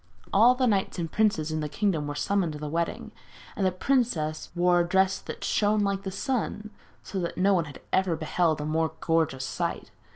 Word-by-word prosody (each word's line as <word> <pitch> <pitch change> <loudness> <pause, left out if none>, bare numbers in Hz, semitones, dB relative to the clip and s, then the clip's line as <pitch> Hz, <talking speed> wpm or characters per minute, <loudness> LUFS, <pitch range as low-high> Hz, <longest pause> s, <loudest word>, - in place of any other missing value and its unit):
All 235 +5 +6
the 255 0 +1
knights 200 -6 +1
and 165 -3 -3
princes 200 -8 +1
in 155 - -1
the 150 -1 -3
kingdom 155 -2 0
were 145 - -4
summoned 180 +1 0
to - - -6
the 150 0 -5
wedding, 165 +2 -2 0.4
and 200 - -2
the 185 - +3
princess 180 - 0
wore 175 0 +3
a - - +4
dress 190 +1 +2
that - - -8
shone 210 0 +2
like 200 -1 0
the 195 - -4
sun, 215 0 -3 0.3
so 195 - -4
that 170 -2 -3
no 195 +2 +3
one 170 -4 +2
had 140 -3 -11
ever 190 -3 +2
beheld 160 0 0
a - - -3
more 160 +1 0
gorgeous 160 -5 0
sight. - - -3
180 Hz, 205 wpm, -27 LUFS, 155-200 Hz, 0.4 s, All